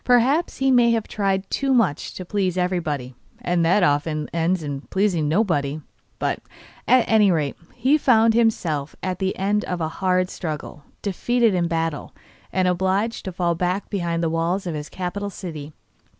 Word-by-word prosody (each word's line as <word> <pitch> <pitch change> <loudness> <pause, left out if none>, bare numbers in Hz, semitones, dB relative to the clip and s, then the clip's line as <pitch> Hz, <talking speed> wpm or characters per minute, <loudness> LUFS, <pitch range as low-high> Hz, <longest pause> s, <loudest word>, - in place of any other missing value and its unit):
Perhaps 255 +7 +3
he 270 0 +2
may 240 -2 +5
have 225 -2 -1
tried 195 -2 -1
too 275 -1 +1
much 190 -12 0
to 185 - -6
please 185 -1 -1
everybody, 165 -8 -1 0.3
and 175 -1 0
that 180 +4 +3
often 150 0 +1
ends 170 +1 0
in 140 -2 -4
pleasing 185 -4 0
nobody; 155 -6 +1 0.4
but, - - -1 0.5
at 255 -1 +5
any 215 -3 +5
rate, 155 -6 0 0.2
he 265 +5 +3
found 225 -4 +4
himself, 175 -11 0
at 185 -1 -2
the 190 -1 -1
end 205 +2 +1
of 180 - -3
a 160 - 0
hard 185 +2 0
struggle, 150 -3 -6 0.2
defeated 230 +3 +1
in 175 -2 +1
battle, 165 -2 -2 0.4
and 185 -1 +1
obliged 190 +5 0
to 190 - -3
fall 175 -1 0
back 180 +3 -2
behind 170 -4 -1
the 165 - +1
walls 170 +4 0
of 175 - -3
his 150 -1 -5
capital 195 +3 -4
city. 155 -6 -7
185 Hz, 170 wpm, -23 LUFS, 165-210 Hz, 0.5 s, may